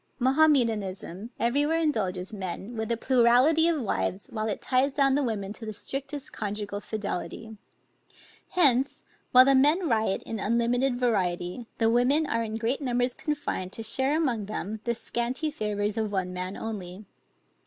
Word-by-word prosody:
Mahometanism 230 - +1
every 240 +5 +2
where 325 +2 +1
indulges 195 - -1
men 195 +3 -5
with 220 +1 -3
a 230 - +1
plurality 255 +7 +4
of 335 -3 +1
wives 200 -4 -2
while 220 -1 -2
it 210 - -2
ties 265 +2 +1
down 275 -2 +3
the 285 - +2
women 210 -6 -2
to 225 - -11
the 215 -1 -5
strictest 280 +6 -5
conjugal 205 -1 -4
fidelity; 220 +1 -5 0.9
hence, 275 -6 +2 0.3
while 255 0 +8
the 275 - +5
men 300 +7 +4
riot 220 -6 +1
in 225 - -5
unlimited 240 +4 +1
variety, 185 -2 -1
the 225 - +2
women 250 +7 +3
are 230 -5 -1
in 220 -1 -3
great 235 +6 -1
numbers 245 -1 0
confined 290 - -3
to 225 - -3
share 265 +6 +1
among 245 -10 0
them 215 0 -4
the 235 0 0
scanty 245 +6 -2
favors 210 -4 -2
of 215 -2 -1
one 185 -2 -2
man 185 +2 -4
only. 200 -3 -6
235 Hz, 160 wpm, -27 LUFS, 210-270 Hz, 0.9 s, while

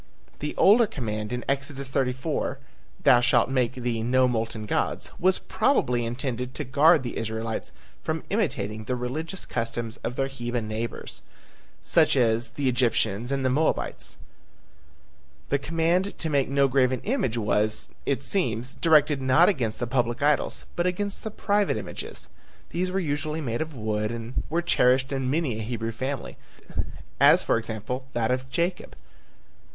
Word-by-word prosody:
The 150 - -4
older 220 +3 +6
command 110 - -4
in 125 0 -3
Exodus 140 -1 -2
34, 135 +3 -1 0.5
"Thou 120 - +7
shall 120 -1 +4
make 130 -1 0
thee 120 -3 -2
no 130 +2 +3
molten 115 -2 -2
gods," - - -1
was 185 +1 +3
probably 125 - +1
intended 125 +1 -3
to 150 - -3
guard 150 +4 +5
the 120 - -4
Israelites 110 0 -3 0.3
from 160 0 -2
imitating 110 - -1
the 125 - -1
religious 155 +9 -4
customs 115 0 -3
of 120 - -4
their 135 - +1
heathen 120 -4 -3
neighbors, 110 +2 -4 0.6
such - - +3
as 115 -1 +2
the 140 -2 -2
Egyptians 120 -2 +1
and 135 -1 0
the 130 - +3
Moabites. 155 +5 0 1.3
The 140 - +2
command 165 +6 0
to 160 - -2
make 140 -3 +2
no 140 0 +3
graven 130 -1 +2
image 205 - 0
was, 105 0 +1 0.2
it 140 -1 -1
seems, 125 - -1
directed 150 -4 +4
not 130 +8 +5
against 120 - -1
the 120 - 0
public 120 +1 0
idols 150 -1 +1
but 175 +1 +1
against 200 +3 -2
the 220 - -3
private 205 - +1
images. 105 - -6 0.4
These 180 +2 -1
were 190 +1 0
usually 155 -1 -2
made 120 -5 -2
of 160 -2 -4
wood 105 -2 -1
and 115 +1 -4
were 170 +3 0
cherished 130 -4 +3
in 135 -1 -1
many 140 -6 0
a - - -3
Hebrew 115 0 -3
family, 130 +3 -4 0.8
as - - +7
for - - +2
example, 115 +3 -5
that 115 0 +1
of 130 +1 -2
Jacob 170 +5 -2
(cf. - - -19
130 Hz, 155 wpm, -26 LUFS, 115-150 Hz, 1.3 s, Thou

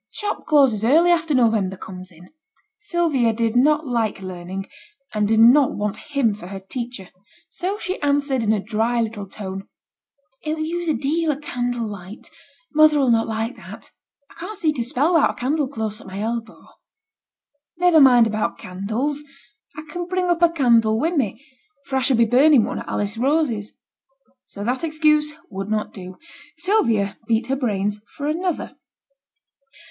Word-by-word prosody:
T' - - -7
shop 415 - -3
closes 270 -9 +4
early 325 +9 +5
after 325 -3 +1
November 220 -6 +2
comes 185 0 -9
in.' 175 0 -17 0.5
Sylvia 335 - +1
did 225 0 -1
not 300 +5 +3
like 230 -6 -1
learning, 185 +1 -6 0.5
and 210 -1 +1
did 220 +1 +2
not 250 +5 +6
want 205 -1 -2 0.2
him 230 -6 +3
for 200 -3 -10
her 195 0 -7
teacher; 230 -1 -7 0.4
so 380 +3 -3
she 375 -3 -4
answered 285 -2 +1
in 215 -1 +1
a 215 - +2
dry 225 +4 -1
little 215 -3 -3
tone, 195 -1 -7 0.7
'It'll 310 0 -2
use 340 +1 -3
a 310 - +2
deal 315 +3 0
o' 280 - -3
candle 245 -5 -3
light; 200 0 -9 0.4
mother 310 -1 +5
'll 265 -3 +3
not 225 -1 +2
like 225 +2 -3
that. - - -12 0.4
I - - -15
can't 385 +5 -6
see 315 -4 +1
to 250 -5 -2
spell 290 +7 +1
wi'out 325 - +4
a - - -3
candle 285 +3 -1
close 220 -5 -5
at - - -14
my 190 +1 -7
elbow.' 225 +1 -4 1.1
'Niver 350 -3 +5
mind 245 -4 +7
about 215 -1 -2
candles. 220 +11 -3 0.5
I 305 - -6
can 345 +3 -5
bring 370 0 -1
up 345 -1 0
a 340 - +6
candle 235 -8 +3
wi' 325 +6 +1
me, 265 - -2 0.4
for 270 -1 -2
I - - +1
should 260 -1 +2
be 235 - +5
burning 260 +2 +5
one - - -3
at - - -9
Alice 205 +2 -2
Rose's.' 260 -6 0 0.7
So 200 - -8
that 250 +7 -2
excuse 305 -1 +2 0.2
would 195 +1 -5
not 215 0 -2
do. 185 -2 -9 0.4
Sylvia 230 - +1
beat 230 0 +1
her 270 - +1
brains 210 -5 -1 0.2
for 285 - -4
another. 335 +3 -2
245 Hz, 175 wpm, -22 LUFS, 215-305 Hz, 1.1 s, mind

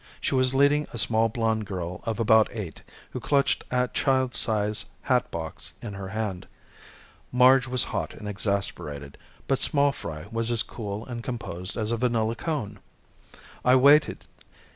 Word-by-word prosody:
She - - -2
was 130 0 +2
leading 145 +2 +3
a - - -5
small 115 0 +2
blonde 110 -2 -1
girl 90 -2 -5
of 115 0 -2
about 110 -1 +5
eight, 100 -9 -7 0.3
who - - -4
clutched 140 +3 +1
a 125 0 +1
child 130 -2 +1
size 105 -1 0 0.2
hatbox 85 -10 -2
in 105 - -7
her 100 -1 -6
hand. 100 -3 -4 0.8
Marge 130 +1 +5
was 130 -1 +2
hot - - -3
and 105 - -8
exasperated, 95 -9 -2 0.3
but 135 - +1
small 140 -1 +3
fry 80 - -7
was 115 0 0
as 120 -2 +2
cool 105 -1 -6
and 120 -2 -6
composed 95 -8 -4
as 110 0 -1
a 115 - 0
vanilla 115 -2 +1
cone. 115 - -4 0.8
I 125 +1 +5
waited. 145 +3 +5
115 Hz, 155 wpm, -26 LUFS, 100-125 Hz, 0.8 s, about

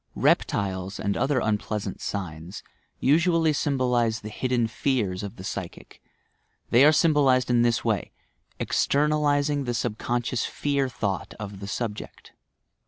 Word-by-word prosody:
Reptiles, 95 -1 0
and 100 -1 -1
other 135 +1 +1
unpleasant 105 -2 -2
signs, 85 -2 -5 0.4
usually 165 +2 +3
sym 140 -1 0
bolize 120 -3 +1
the 105 - -5
hidden 125 +2 0
fears 110 -5 -1
of 100 -2 -6
the 95 - -10
psychic; 95 -3 -7 0.7
they 120 +3 +6
are 150 - +8
symbol 150 -3 +4
ized 130 -1 +3
in 120 -1 +4
this 120 0 +1
way 110 -5 0 0.2
— - - -40
"externalizing" 145 -1 +1
the 120 -1 -2
subconscious 120 +1 -1
fear 140 -2 -1
thought 100 -6 -3
of 100 -2 -7
the 100 - -7
subject. 110 0 -5
120 Hz, 140 wpm, -25 LUFS, 105-140 Hz, 0.7 s, are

